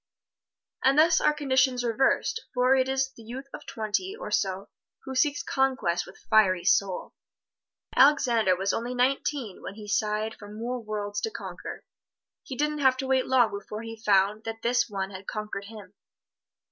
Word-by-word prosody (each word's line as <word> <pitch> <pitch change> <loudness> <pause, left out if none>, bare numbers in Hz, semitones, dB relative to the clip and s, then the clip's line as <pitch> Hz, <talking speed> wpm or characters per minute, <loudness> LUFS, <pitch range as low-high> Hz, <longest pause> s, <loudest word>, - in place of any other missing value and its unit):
And 270 +2 +4
thus 320 +1 +5
are - - +4
conditions 260 -4 +1
reversed, 245 - +1
for 250 +1 +4
it 260 0 +2
is 265 0 0
the - - -13
youth 245 +5 -8
of - - -9
twenty 225 - -2
or - - -6
so 190 0 -1 0.3
who 265 - -6
seeks 290 +2 +1
conquest 260 -11 0
with 190 - -13
fiery 190 -5 +4
soul. 190 -1 +1 0.8
Alexander 240 -8 +4
was 195 +2 -1
only 240 +2 -3
nineteen 255 -3 -1
when 195 - -7
he 210 -1 -10
sighed 215 +1 0
for 205 0 -10
more 235 +3 -4
worlds 205 -2 -4
to - - -1
conquer. - - -8 0.6
He 260 - -8
didn't 300 0 0
have 265 -2 +4
to 265 - -3
wait 260 -1 +1
long 250 -3 +4
before 205 +2 -6
he 225 0 -7
found 210 0 +2
that 225 0 -6
this 245 +1 +2
one 195 -1 -3
had 190 0 -10
conquered 210 -2 -5
him. 205 -3 -11
230 Hz, 170 wpm, -27 LUFS, 205-265 Hz, 0.8 s, thus